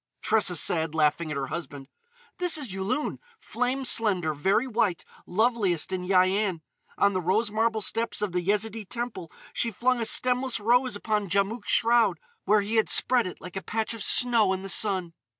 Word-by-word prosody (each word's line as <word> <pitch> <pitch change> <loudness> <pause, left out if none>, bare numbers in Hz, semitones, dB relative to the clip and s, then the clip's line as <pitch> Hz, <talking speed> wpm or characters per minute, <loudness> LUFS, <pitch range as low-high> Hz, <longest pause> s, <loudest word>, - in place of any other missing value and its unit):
Tressa 210 -5 +2
said, 160 -1 +1
laughing 155 +1 +1
at 150 - -3
her 135 - -2
husband: 145 -5 -7 0.5
"This 355 -2 +3
is 265 -10 -5
Yulun, 200 +10 -2 0.2
flame 255 +2 -2
slender, 190 -10 +2
very 190 - +1
white, 215 -8 -1 0.2
loveliest 205 -4 0
in 180 -1 -3
Yian. 185 -1 +2 0.4
On 200 0 +3
the 185 - -1
rose 205 +5 0
marble 220 0 0
steps 230 +3 -2
of 205 - -1
the 180 0 -1
Yezidee 210 +2 -1
Temple 235 -9 -5 0.2
she 235 - 0
flung 240 +3 0
a - - -1
stemless 250 -1 +1
rose 245 +2 +2
upon 210 -1 -2
Djamouk's 200 +4 -1
shroud, 225 -7 +3 0.3
where 210 +1 +4
he 215 +3 -2
had 220 - +2
spread 245 -5 +3
it 180 - -9
like 180 0 -10
a 195 - -3
patch 220 +3 -3
of 225 - -8
snow 230 -6 +2
in 190 0 -5
the 195 - -5
sun. 185 -5 0
205 Hz, 180 wpm, -26 LUFS, 185-230 Hz, 0.5 s, where